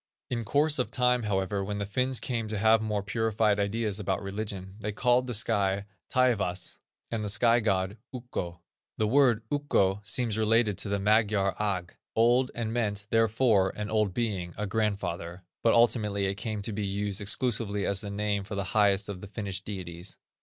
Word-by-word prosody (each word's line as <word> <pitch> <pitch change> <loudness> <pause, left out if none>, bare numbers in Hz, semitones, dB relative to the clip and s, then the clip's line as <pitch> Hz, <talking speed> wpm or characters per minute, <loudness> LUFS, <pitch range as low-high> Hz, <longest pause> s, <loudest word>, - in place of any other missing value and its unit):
In 120 -2 -1
course 145 +5 +2
of 125 - 0
time, 125 -1 +2
however, 100 -2 -1
when 105 +1 -3
the 100 - -2
Finns 125 +5 0
came 115 -3 -3
to 110 0 -3
have 110 +2 +4
more 105 -2 -1
purified 110 0 +1
ideas 105 0 -1
about 95 -2 -1
religion, 100 -1 -5
they 105 0 -3
called 125 +3 +2
the 120 - -2
sky 100 -2 +1 0.2
Taivas 105 -8 0 0.3
and 115 -2 -2
the 105 - -1
sky 115 +3 +4
god 95 -2 0
Ukko. 90 -9 -5 0.4
The 110 - +1
word, 120 -3 +4
Ukko, 105 -9 +1
seems 110 +2 -1
related 110 -1 +3
to 105 - -1
the 100 - +1
Magyar 105 -1 +2
Agg, 95 -4 -2 0.2
old, 120 +3 +4
and 115 -1 -2
meant, 105 -4 -1
therefore, 110 -3 +3
an 105 0 -4
old 105 -3 +2
being, 95 -5 -2
a 105 - -2
grandfather; 95 -4 -2 0.2
but 115 - +4
ultimately 105 -4 +3
it 95 - 0
came 100 +1 -4
to 110 - -1
be 105 +1 -3
used 100 +1 -1
exclusively 105 -1 0
as 100 -1 +1
the 105 - -5
name 100 0 -1
of 100 - -4
the 100 - 0
highest 100 -2 +3
of 100 -3 -6
the 105 - -8
Finnish 100 -2 -4
deities. 90 -3 -7
105 Hz, 180 wpm, -28 LUFS, 100-115 Hz, 0.4 s, have